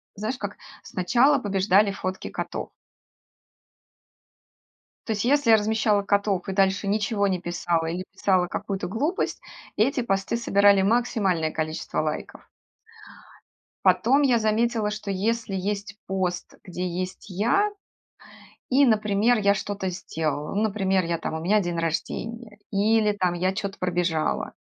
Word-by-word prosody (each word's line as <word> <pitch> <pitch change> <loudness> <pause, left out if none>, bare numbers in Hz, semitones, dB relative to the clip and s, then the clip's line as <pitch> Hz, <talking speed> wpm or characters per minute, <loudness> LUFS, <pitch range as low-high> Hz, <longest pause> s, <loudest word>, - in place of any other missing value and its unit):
знаешь, 220 +5 -3
как 205 0 -6 0.3
сначала 245 +10 +2
побеждали 200 -1 +2
фотки 190 -1 -5
котов. - - -5 2.4
То 225 - +1
есть, 210 +1 -2
если 285 -1 +3
я 220 - +8
размещала 215 -1 +1
котов 200 -2 0
и 195 - -2
дальше 195 +1 +2
ничего 205 0 +1
не 185 -2 0
писала 170 -2 -1
или 175 +3 -3
писала 185 -2 +2
какую-то 195 0 -4
глупость, 285 - -2 0.3
эти 250 +4 +2
посты 195 0 -1
собирали 200 -3 +4
максимальное 195 -7 +1
количество 155 +1 -3
лайков. 155 0 -5 1.4
Потом 265 +5 +4
я 255 -4 +4
заметила, 220 0 +1
что 210 -1 -6
если 205 +1 -1
есть 200 +2 -3
пост, 185 -2 -3
где 180 0 -4
есть 185 +3 -5
я 235 - +2 1.0
и, 270 +2 +5
например, 215 0 +3
я 200 -1 +3
что-то 200 -1 -3
сделала, 160 -3 -3
ну, 210 - +1
например, 195 -3 +1
я 170 0 -1
там - - -4
у 160 - -3
меня 205 +6 +3
день 175 -2 -3
рождения 210 +7 -4
или 210 +1 +3
там 180 -3 0
я 185 +2 0
чё-то 200 -2 -4
пробежала, 175 -3 -1
200 Hz, 135 wpm, -25 LUFS, 185-220 Hz, 2.4 s, я